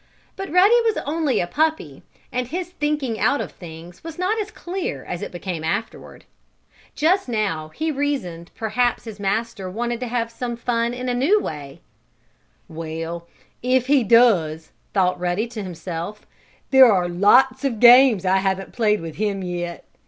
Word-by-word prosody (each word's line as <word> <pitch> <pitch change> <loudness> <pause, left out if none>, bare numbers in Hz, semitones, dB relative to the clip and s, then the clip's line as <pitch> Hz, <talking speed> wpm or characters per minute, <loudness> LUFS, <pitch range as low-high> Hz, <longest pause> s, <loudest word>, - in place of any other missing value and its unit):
But 390 0 -6
Ruddy 400 +7 +5
was 450 -2 0
only 295 -5 0
a - - 0
puppy 290 - -1 0.3
and 250 -1 -2
his 355 +5 -5
thinking 295 -8 -2
out 285 - +2
of - - -4
things 170 0 -12
was 330 -1 -8
not 405 +5 0
as 415 - -5
clear 350 - -5
as 175 - -5
it - - -5
became 175 -2 -5
afterward. 200 +7 -4 0.7
Just 350 +1 +2
now 195 -9 -2
he 315 - -3
reasoned 260 - -3
perhaps 235 +2 0
his 220 -3 -9
master 200 0 -2
wanted 235 +4 -3
to 250 - -4
have 230 -1 -2
some 240 +1 -4
fun 235 0 -1
in 250 +1 -5
a 250 - 0
new 290 +13 +3
way. 145 - -7 0.9
"Well, 165 +1 -6 0.3
if 255 0 +2
he 275 -1 +3
does," 185 -9 +3 0.2
thought 185 -2 +1
Ruddy 180 +5 -1
to 225 -2 -6
himself, 180 +2 -6 0.5
"there 265 -3 +8
are 180 -3 +2
lots 250 +9 +4
of 250 -6 -1
games 245 -4 +7
I 185 +1 +3
haven't 190 0 -2
played 210 -4 +1
with 165 -2 -8
him 200 -2 -1
yet. 175 -2 -5
230 Hz, 165 wpm, -22 LUFS, 180-265 Hz, 0.9 s, there